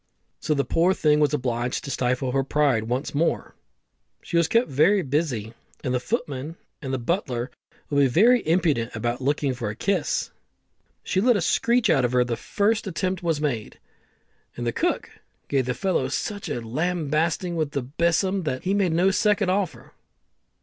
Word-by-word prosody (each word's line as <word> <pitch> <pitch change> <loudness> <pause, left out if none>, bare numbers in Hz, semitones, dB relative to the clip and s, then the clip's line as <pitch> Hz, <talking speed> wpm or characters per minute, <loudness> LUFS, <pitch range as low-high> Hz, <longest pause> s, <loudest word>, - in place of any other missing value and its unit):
So 155 - 0
the 140 - 0
poor 175 +3 +2
thing 150 -1 +3
was 150 -2 +3
obliged 125 -3 -1
to 140 - -5
stifle 125 0 0
her 135 +1 +1
pride 135 -5 +1
once 125 +5 -2
more. 160 +4 0 0.7
She - - -5
was 170 -1 +4
kept 230 +6 +2
very 175 +8 +3
busy, 130 -6 -2 0.3
and 125 - -1
the 125 - +1
footman 145 - -3 0.3
and 135 -3 -4
the 130 - 0
butler 125 - -2 0.4
would 140 - +2
be 140 - +5
very 225 - +5
impudent 155 -10 +1
about 120 +3 -2
looking 140 0 0
for 120 -4 -4
a 105 - -5
kiss, 185 - -1 0.6
but - - -28
she 190 - +1
let 240 0 +4
a - - 0
screech 235 +7 +2
out 135 -4 +3
of 125 0 0
her 125 0 +4
the 120 -1 -2
first 210 - 0
attempt 185 0 -2
was 165 -3 0
made, 125 -8 -3 0.8
and 120 - -4
the 120 - +1
cook - - -1 0.4
gave 135 -3 0
the 125 - -1
fellow 185 -9 0
such 205 +9 -3
a 120 - -3
lambasting 160 +6 -1
with 155 -3 -2
the 140 - -1
besom 170 +8 +1
that 130 -6 -3
he 190 - 0
made 195 -5 +2
no 180 +4 +3
second 205 -1 +2
offer. 195 -2 -2
150 Hz, 185 wpm, -24 LUFS, 125-185 Hz, 0.8 s, be